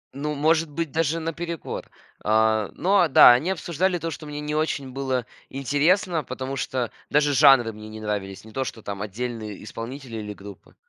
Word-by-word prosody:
Ну, 150 +1 -3
может 160 +2 +2
быть, 160 -1 -3
даже 165 0 0
наперекор. 165 +1 -5 0.3
А, 110 0 +2
но, 195 +2 +3
а 170 - +4
да, 125 - +9
они 150 +10 +1
обсуждали 175 +1 0
то, 165 0 -4
что 155 0 -8
мне 150 0 -5
не 150 0 -3
очень 140 -4 -1
было 130 -2 -2 0.2
интересно, 150 +5 +1
потому 130 +2 -5
что 125 -3 -2 0.2
даже 145 0 +3
жанры 135 -6 +6
мне 110 0 -10
не 110 0 -8
нравились, 105 -2 -4
не 110 - -12
то, 135 +4 -1
что 110 -4 -7
там 100 -1 -5
отдельные 110 0 -5
исполнители 115 +2 -7
или 105 -1 -5
группы. 100 -1 -13
135 Hz, 180 wpm, -24 LUFS, 110-155 Hz, 0.3 s, да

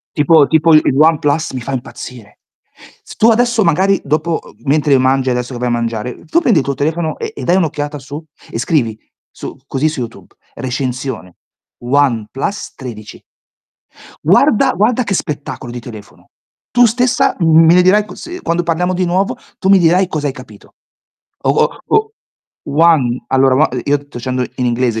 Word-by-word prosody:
Tipo 150 0 +5
tipo 160 0 +3
il 155 - +7
il 135 - +1
OnePlus 155 -1 +2
mi 130 -2 -5
fa 135 - -6
impazzire. 120 -3 -8 0.6
Se - - -12
tu 225 - +5
adesso 235 -1 +2
magari 190 +4 +2
dopo, 160 +3 -1
uhm, - - -16
mentre 145 -1 +3
mangi, 130 0 +1
adesso 125 +1 -2
che 120 - -6
vai 125 0 -1
a - - 0
mangiare, 115 0 -2
uhm, - - -14
tu 340 +1 +1
prendi 225 - +3
il - - -3
tuo 140 - -1
telefono 155 +4 -2
e 445 -1 -5
e - - -7
dai 175 - +2
un'occhiata 150 -4 -1
su 145 +4 -8 0.3
e 115 - -5
scrivi 120 -7 0 0.3
su - - -9
così 140 +3 0
su 150 -5 -3
YouTube: 115 -1 -9 0.2
"recensione 125 -6 -4 0.4
OnePlus 135 - -1
13" 110 -5 -9 1.0
guarda 210 - +4
guarda 225 +7 +1
che 200 -3 -2
spettacolo 145 -6 -5
di 120 - -6
telefono. 110 -4 -12 0.4
Tu 245 0 +5
stessa 245 +2 +1
m 165 -1 +5
me 165 - +6
ne 180 - +6
dirai 205 +3 +3
q - - -11
s - - -10
uhm, 360 +1 -7
quando 170 +1 0
parliamo 180 +2 0
di 180 0 0
nuovo 185 +3 0 0.2
tu - - -2
mi 195 -1 +6
dirai 180 +2 +3
cosa 150 -4 -3
hai 135 - -3
capito. 110 -5 -14 0.7
O - - +2
o - - +1
o 435 0 +1 0.5
one 145 -5 +2
allora 135 0 +3
ua 155 +4 +3
i 125 - -3
io 145 0 +2
sto 145 -2 -15
dicendo 125 +1 -2
in 125 - -1
inglese, 120 -2 0
145 Hz, 185 wpm, -15 LUFS, 125-175 Hz, 1.0 s, il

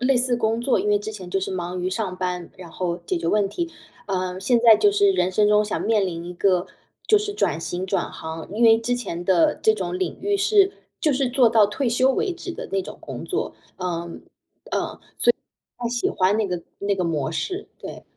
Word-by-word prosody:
类 260 +2 +3
似 250 -1 +2
工 225 0 0
作。 250 +1 +2
因 210 - -1
为 205 - +4
之 210 +1 -6
前 185 -4 -9
就 195 - 0
是 190 - -3
忙 180 -1 -3
于 180 - -1
上 190 -1 -2
班， 180 -1 -3
然 180 -2 -10
后 175 0 -2
解 180 - 0
决 170 - -3
问 200 +2 +2
题， 340 - -4 0.3
呃， 185 -2 -2
现 235 +5 +2
在 230 -2 +8
就 410 - +4
是 405 -1 +4
人 185 - +1
生 210 +2 +3
中 210 0 +4
想 210 - -3
面 210 -4 +2
临 170 -1 -5
一 180 - -7
个 185 0 +2 0.4
就 430 - +5
是 415 0 -1
转 405 - 0
型、 175 +3 -4
转 190 -1 -1
行。 160 0 -7
因 225 +3 -1
为 225 -1 +7
之 235 +2 -1
前 175 -8 -5
的 175 -3 +4
这 220 - +3
种 180 -3 -3
领 185 -3 -2
域 405 +2 +1
是， 400 -1 +4 0.3
就 305 -4 +3
是 265 -1 +1
做 250 -2 +4
到 220 -2 +5
退 245 +5 -1
休 255 +3 +3
为 385 +5 0
止 350 +1 -7
的 - - -7
那 195 - +2
种 - - -9
工 - - -7
作， - - -2 0.2
嗯， 180 -1 -4 0.2
呃， - - -8
所 170 - -8
以 - - -9 1.6
不 245 - -9
太 235 - 0
喜 240 0 0
欢 190 +3 +2
那 215 -3 +1
个 180 -2 -3 0.2
那 200 0 0
个 185 - -1
模 155 -3 -1
式， 370 - -3
对。 - - -8
205 Hz, 255 characters per minute, -23 LUFS, 180-245 Hz, 1.6 s, 在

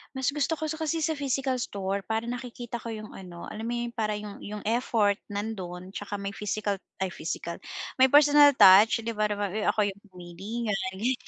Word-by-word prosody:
Mas 265 +1 0
gusto 295 +2 0
ko 315 - -7 0.2
kasi 320 0 -1
sa 320 - +1
physical 270 -3 -1
store 195 -3 -2
para 220 +3 -2
nakikita 240 0 -5
ko 230 - -9
yung 215 -1 -6
ano, 180 -2 -10
alam 220 +2 -5
mo 240 - -1
yun, 240 0 -3
para 215 -3 -1
yung 210 -1 -7
yung 210 0 -7
effort 220 -3 +1
nandun 190 -4 -5
tsaka 205 +1 -5
may 200 0 -4
physical 205 -1 -2 0.2
ay 185 - -2
physical, 170 +1 -5 0.4
may 260 - +8
personal 290 0 +7
touch, 210 +2 +7
di 230 - -2
ba, 215 -1 +1 0.4
ako 215 - +3
yung 195 - -16
pumili 180 +1 -10
niyan, 210 -3 0 0.2
ganiyan, 250 +5 -2
215 Hz, 185 wpm, -27 LUFS, 200-250 Hz, 0.4 s, may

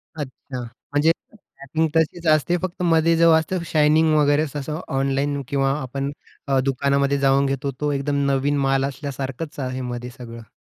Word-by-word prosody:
अच्छा. 130 -3 -7
म्हणजे 145 +6 0 0.2
पॅकिंग 160 -6 -3
तशीच 160 +1 +1
असते. 155 +3 +3
फक्त 180 -1 -4
मध्ये 165 -1 +3
जो 165 0 +6
असतं 170 +2 +1
शायनिंग 155 +1 +4
वगैरे 145 +1 +3
तसं 150 +3 -4 0.2
ऑनलाईन 140 +1 0
किंवा 135 -1 +1
आपण 135 +2 -3 0.4
अ, 135 -1 +2
दुकानामध्ये 140 +1 +1
जाऊन 135 0 +3
घेतो. 135 0 -1
तो 150 0 +1
एकदम 140 0 0
नवीन 140 +2 +1
माल 135 0 +2
असल्यासारखंच 140 +2 -5
आहे 130 0 -3
मध्ये 120 0 -5
सगळं. 115 -3 -10
140 Hz, 155 wpm, -22 LUFS, 135-155 Hz, 0.4 s, जो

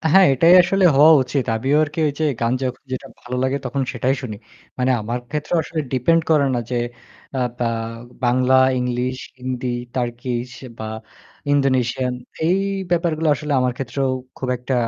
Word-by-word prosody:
অ্যা 160 - +1
হ্যাঁ, 190 -1 +8
এটাই 165 +7 +6
আসলে 190 +2 +1
হওয়া 155 +3 +8
উচিত। 130 +1 -2
আমিও 135 +6 +1
আরকি 150 +2 -9
ওই 145 - 0
যে - - +2 0.2
গান 115 +1 +1
যখন 130 0 -3
যেটা 130 - -4
ভালো 125 0 -5
লাগে 130 +1 0
তখন 135 +2 -1
সেটাই 130 +2 0
শুনি। 110 -5 -5 0.4
মানে 125 +1 +1
আমার 115 +3 -3
ক্ষেত্রেও 150 +3 -1
আসলে 160 +1 -3
ডিপেন্ড 165 +6 +3
করে 145 -3 +4
না 120 - 0
যে 125 - -1 0.6
আ - - 0 0.2
বা 120 -1 0 0.6
বাংলা, 130 +2 +3 0.2
ইংলিশ, 125 +1 -1 0.2
হিন্দি, 125 0 -3 0.3
টার্কিশ 120 0 -3 0.3
বা 110 - -5 0.7
ইন্দোনেশিয়ান 130 -2 +1 0.3
এই 180 +3 +3 0.3
ব্যাপারগুলো 165 -2 +1
আসলে 150 +1 -4
আমার 125 0 +1
ক্ষেত্রেও 135 +1 -2 0.3
খুব 130 - -4
একটা 125 +2 -3
130 Hz, 165 wpm, -21 LUFS, 125-150 Hz, 0.7 s, হ্যাঁ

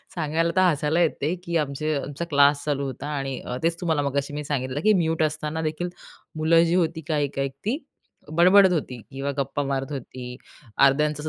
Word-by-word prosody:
सांगायला 165 +1 0
तर 185 - +4
हसायला 160 -2 +2
येते 160 -1 0
की 170 -1 -1
आमचे 150 +1 -1
आमचा 145 +4 -4
क्लास 145 0 +4
चालू 140 -2 -1
होता 135 +2 -6
आणि 135 -1 -3 0.2
तेच 165 0 0
तुम्हाला 160 -4 +1
मगाशी 140 0 -2
मी 150 0 -4
सांगितलं 135 0 -2
की 215 0 +5
म्यूट 165 -3 +1
असताना 155 +1 -2
देखील 160 +3 -2 0.5
मुलं 165 +2 +4
जी 170 +1 +1
होती 165 -2 0
काही-काही 140 -3 -1 0.2
ती 245 +7 0 0.5
बडबडत 185 +3 +6
होती 125 -7 -3
किंवा 140 +1 -3
गप्पा 140 +1 -1
मारत 135 +1 -2
होती. 125 -2 -7 0.5
अर्ध्यांचं 150 +2 +3
150 Hz, 170 wpm, -24 LUFS, 140-165 Hz, 0.5 s, बडबडत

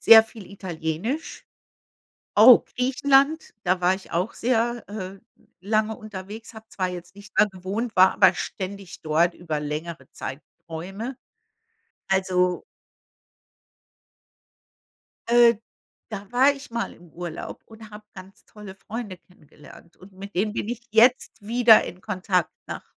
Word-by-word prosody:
sehr 225 -1 +9
viel 220 -3 -12
Italienisch. 185 - -4 0.9
Oh, 230 +4 +9 0.2
Griechenland, 275 +4 +2
da 180 +1 +1
war 180 +1 +3
ich 190 - -11
auch 180 +6 -1
sehr, 235 0 0
äh, 195 -2 -7 0.4
lange 215 +2 0
unterwegs, 215 +1 -9
habe 220 -1 -13
zwar 185 -4 -2
jetzt 180 +1 -9
nicht 205 +1 -14
da - - +6
gewohnt, 200 +4 -5
war 185 +1 +7
aber 190 -2 +5
ständig 195 0 -6
dort 165 +3 +2
über 160 -4 -4
längere 150 -1 -5
Zeitrräume. 175 - -7 0.9
Also 185 -2 +1 2.7
Äh, 235 -1 +6 0.5
da 205 -2 -6
war 265 +3 +5
ich 275 -2 -12
mal 235 0 -3
im 175 -1 -18
Urlaub 175 -2 -7
und 220 -1 -13
habe 210 0 -11
ganz 190 0 -13
tolle 210 -3 -11
Freunde 205 -1 -7
kennengelernt. 155 -1 -18
Und 190 +1 -16
mit 200 +2 -10
denen 210 +3 0
bin - - -3
ich 240 0 -4
jetzt 235 +3 +3
wieder 230 -1 +6
in 180 - -9
Kontakt. 185 -2 -1 0.2
Nach - - -6
200 Hz, 130 wpm, -24 LUFS, 180-225 Hz, 2.7 s, sehr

